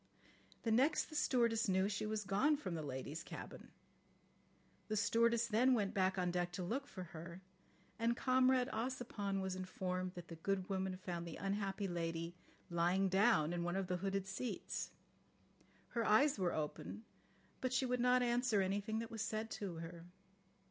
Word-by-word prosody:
The 225 - +1
next 270 +10 +3
the - - -7
stewardess 235 -6 +2
knew 190 +1 +3
she 205 +1 -2
was 215 0 -1
gone 230 +11 +3
from 190 - -4
the 165 - -2
ladies' 140 +2 -4
cabin. - - -8 1.2
The 215 - -1
stewardess 230 +2 +3
then 240 +3 +4
went 205 -4 0
on 185 -2 +2
deck 175 0 0
to 180 - -3
look 265 +10 -2
for 185 - -7
her, 170 +3 -8 0.6
and 235 +1 +2
Comrade 255 -1 +4
Ossipon 220 -4 -2
was 190 -1 -2
informed 185 0 -3
that 175 -1 -8
the 165 - -8
good 190 +2 -1
woman 190 -1 -1
found 175 -2 -4
the 165 - -6
unhappy 195 0 -1
lady 165 -1 -2 0.4
lying 175 +3 +2
down 190 -5 +4
in 175 - -1
one 175 +1 -1
of 195 0 0
the 180 0 -1
hooded 195 +1 -1
seats. 195 +6 -3 1.0
Her 235 - 0
eyes 265 +4 +4
were 180 -2 +2
open, 160 +8 -4 0.6
but 255 - 0
she 260 +1 +2
would 250 0 0
not 250 +1 +4
answer 240 -2 +2
anything 200 +3 0
that 230 +1 -4
was 225 -2 -4
said 220 0 -2
to 195 -5 -4
her. 165 +1 -7
195 Hz, 170 wpm, -38 LUFS, 180-230 Hz, 1.2 s, then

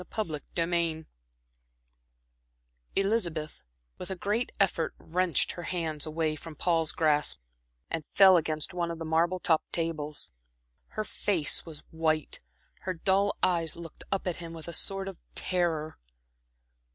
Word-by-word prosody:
Chapter 160 -9 -2 0.2
XI 165 -2 0 1.9
Elizabeth 180 -7 0 0.4
with - - -6
a 190 - -2
great 210 +6 -1
effort 175 -5 +2
wrenched 175 -2 +1
her 175 - -7
hands 165 -3 -1
away 155 0 0
from 155 +1 -9
Paul's 165 -2 +2
grasp, 150 - +2 0.5
and 160 - -3
fell 190 -1 +9
against 155 -2 +1
one 175 -1 -1
of 170 - -4
the 165 - -5
marble 165 +3 +2
topped 160 -2 +1
tables. 155 - -1 0.7
Her 215 - +1
face 180 -7 +2
was 155 -2 -8
white, 155 -2 0 0.4
her 185 -1 -3
dull 195 +4 +2
eyes 170 -3 +3
looked 170 -2 -9
up 195 - 0
at 180 -3 -1
him 170 -1 -7
with 165 0 -8
a 170 - -5
sort 195 +3 +2
of 195 -3 -7 0.2
terror. 165 -4 0
165 Hz, 140 wpm, -29 LUFS, 155-185 Hz, 1.9 s, fell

